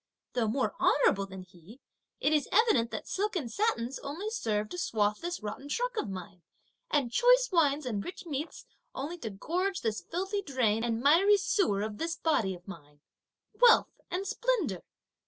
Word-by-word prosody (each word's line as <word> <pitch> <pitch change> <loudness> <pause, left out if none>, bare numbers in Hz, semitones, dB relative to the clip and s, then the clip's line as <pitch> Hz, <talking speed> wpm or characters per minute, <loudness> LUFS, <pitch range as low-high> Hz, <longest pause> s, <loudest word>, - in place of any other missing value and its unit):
Though 240 -3 +1
more 255 +5 0
honourable 200 -8 +3
than 190 -1 -9
he, 185 +6 -16 0.4
it 300 - +2
is 300 -3 +2
indeed 385 - +4
evident 260 - +3
that - - -6
silk 410 +1 -1
and 270 -10 -2
satins 270 - -1
only 335 +10 -5
serve 215 - -1
to 355 - -5
swathe 210 -9 +1
this 345 -7 -5
rotten 270 +7 -6
trunk - - -1
of 430 - -2
mine, 180 -2 -8 0.5
and 275 - +1
choice - - +5
wines 305 -4 +2
and 210 -5 -2
rich 365 - -8
meats 300 0 -5 0.3
only 315 +6 -5
to 225 - -4
gorge 360 - -2
the 225 - +1
filthy 380 - -3
drain 245 - 0
and 230 -1 -1
miry 355 +9 +5
sewer 370 - +1
of 215 -1 -5
this 330 +1 -2
body 220 - 0
of 180 +2 -17
mine! 150 -6 -12 0.5
Wealth! 485 -1 +5 0.2
and 375 +2 -2
splendour! 395 - -1
280 Hz, 175 wpm, -30 LUFS, -, 0.5 s, choice